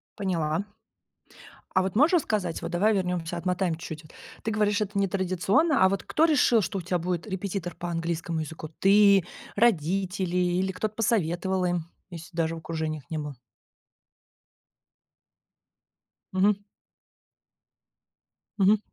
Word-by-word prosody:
Поняла. 170 -2 -1 1.1
А 185 - +5
вот 190 +1 -3
можешь 300 +9 +5
рассказать, 210 - 0
вот 170 +1 -5
давай 205 +5 +3
вернёмся, 180 -3 -1
отмотаем 180 -1 0
чуть-чуть 160 -1 -8
вот. 155 - -17 0.3
Ты 220 - -1
говоришь, 210 0 +1
это 200 -1 -2
нетрадиционно, 195 - +2
а 190 - +6
вот 195 0 -2
кто 315 - +2
решил, 265 -7 +4
что 195 +1 -2
у - - -5
тебя 180 +1 -1
будет 175 +3 -3
репетитор 190 -3 -4
по 175 - -5
английскому 165 0 -2
языку? 155 0 -6
Ты, 200 -1 +6 0.3
родители 185 -3 +1
или 180 +1 +1
кто-то 210 +3 -3
посоветовал 190 -4 0
им, 175 -2 -1 0.2
если 170 0 -10
даже 165 0 0
в - - -7
окружениях 160 -2 -4
не 160 - -3
было? 150 -2 -5 3.0
Мгм. 200 +2 +3 2.0
Мгм. 205 +1 +5
185 Hz, 130 wpm, -27 LUFS, 170-200 Hz, 3.0 s, а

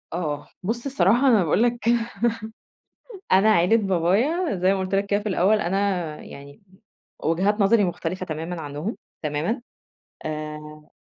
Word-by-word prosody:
آه، 155 -4 -3 0.2
بص 235 +6 -2
الصراحة 245 0 +3
أنا 220 -7 +5
باقول 175 +7 +2
لك 240 0 +1
كده 235 0 +2 1.3
أنا 195 +4 +6
عِيلة 180 +5 +4
بابايا 205 - +1
زي 185 +2 +2
ما 195 - -2
قلت 190 +1 -2
لك 200 +1 +1
كده 205 0 +1
في 210 - -4
الأول 200 +3 +3
أنا 195 0 0 0.4
يعني 140 +6 -12 0.6
وجهات 195 +6 +1
نظري 205 +1 +4
مختلفة 180 +1 -3
تمامًا 165 +2 -5
عنهم 150 +8 -5 0.3
تمامًا 155 - -1 0.7
آآ 150 0 -6
190 Hz, 140 wpm, -24 LUFS, 165-220 Hz, 1.3 s, أنا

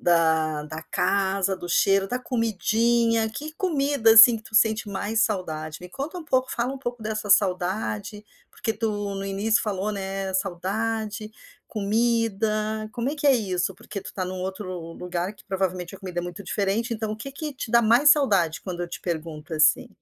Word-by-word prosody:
da 160 -3 +2
da 155 +1 -7
casa, 195 +2 0
do 175 -1 -8
cheiro, 195 +3 +3
da 250 - -1
comidinha, 230 -1 +1
que 300 +8 -7
comida, 285 - +2
assim, 225 +1 +10
que - - -16
tu 220 - -15
sente 220 -1 +3
mais 210 +3 0
saudade?" 155 -7 -2
Me 180 - -10
conta 285 - -5
um 345 - -7
pouco, 260 -4 +1
fala 240 +2 -1
um 275 - -7
pouco 240 -3 -5
dessa 215 -1 -3
saudade, 200 +2 +1 0.3
porque 225 - -3
tu 225 +1 -2 0.3
no 195 0 -4
início 200 +3 +1
falou, 205 0 -2
né, 195 -1 -4
saudade, 210 +3 -2 0.4
comida, 215 0 0
como 240 +2 -2
é 305 - -5
que 295 0 -1
é 280 - +7
isso? 185 -6 -1
Porque 205 -2 -7
tu - - -12
está 185 - -4
em 180 - -5
um 185 0 -5
outro 185 -3 -5
lugar 180 +2 -4
que - - -19
provavelmente 185 -2 -2
a - - -17
comida 180 -2 -4
é - - -7
muito 175 +1 -7
diferente 205 +5 -1
então 220 -1 -3
o - - -5
que 275 +5 -8
que 300 +2 -5
te 255 - -6
dá 235 0 +5
mais 240 +7 +6
saudade 195 - +1
quando 180 -2 -5
eu 175 - -3
te - - -7
pergunto 160 -1 -5
assim? 155 -1 +3
210 Hz, 190 wpm, -25 LUFS, 185-230 Hz, 0.4 s, assim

